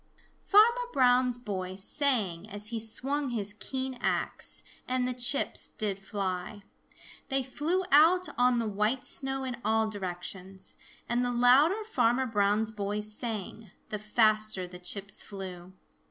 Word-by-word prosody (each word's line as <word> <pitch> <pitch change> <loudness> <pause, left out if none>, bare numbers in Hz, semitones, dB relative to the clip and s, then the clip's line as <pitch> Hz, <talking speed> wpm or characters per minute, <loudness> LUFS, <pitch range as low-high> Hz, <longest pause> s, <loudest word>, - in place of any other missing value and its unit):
Farmer 470 +4 +5
Brown's 250 -1 +3
boy 190 -6 -5
sang 205 - -1
as 205 +1 -5
he 230 -1 -3
swung 270 +6 -1
his 205 -4 -3
keen 260 +4 -5
axe, - - 0 0.2
and 255 0 0
the 250 - -1
chips 250 +3 +2
did 200 -2 -2
fly. 195 0 -4 0.7
They 270 -1 +1
flew 310 +8 -1
out 335 +6 +6
on 245 0 +3
the 230 - 0
white 210 +5 0
snow 270 0 0
in 255 -2 -4
all 220 +1 +2
directions. 190 -1 -5 0.3
And 240 +1 +1
the 245 - 0
louder 270 - +4
Farmer 255 - +1
Brown's 215 -1 +1
boy 205 0 -3
sang, 215 -1 -5 0.2
the 210 - -4
faster 215 -2 +2
the 180 0 -11
chips 195 +2 -4
flew. 185 -2 -8
220 Hz, 140 wpm, -29 LUFS, 200-260 Hz, 0.7 s, out